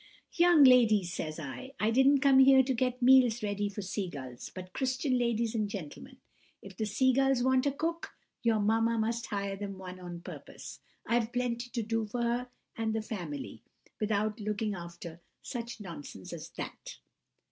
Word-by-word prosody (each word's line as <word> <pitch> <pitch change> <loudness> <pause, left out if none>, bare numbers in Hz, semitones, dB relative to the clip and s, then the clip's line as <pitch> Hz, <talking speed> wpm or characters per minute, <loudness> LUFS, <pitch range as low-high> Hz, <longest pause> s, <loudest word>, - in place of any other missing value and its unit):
"'Young 345 -3 +6
ladies,' 220 -8 +5
says 155 -2 -4
I, 160 - -7
'I 215 +1 +2
didn't 265 +3 +4
come 275 -2 +6
here 265 0 +7
to 265 +1 0
get 250 +1 -1
meals 245 -3 +5
ready 205 0 -1
for 200 0 -6
sea 190 0 -3
gulls, 130 -5 -8
but 185 -1 -8
Christian 260 0 0
ladies 235 -1 0
and 215 -3 -1
gentlemen. 150 - -8 0.4
If 195 -1 -12
the 215 +3 -2
sea 260 +5 +2
gulls 270 -1 +2
want 260 +1 +3
a - - +2
cook, 330 +4 -3 0.3
your 230 -3 +2
mamma 225 +2 +2
must 230 +1 -1
hire 200 -1 -3
them 195 -1 -6
one 185 -1 -9
on 175 -1 -8
purpose. - - -10 0.3
I've 235 -1 +1
plenty 245 -1 -2
to 235 -2 -3
do 225 0 -1
for 240 +3 -3
her 240 +1 -1 0.3
and 220 -1 -1
the 220 - -1
family, 235 +7 -6 0.4
without 215 +1 0
looking 210 0 -2
after 170 -2 -9 0.2
such 235 -2 -6
nonsense 165 - -9
as - - -7
that! - - -7
225 Hz, 175 wpm, -30 LUFS, 200-255 Hz, 0.4 s, here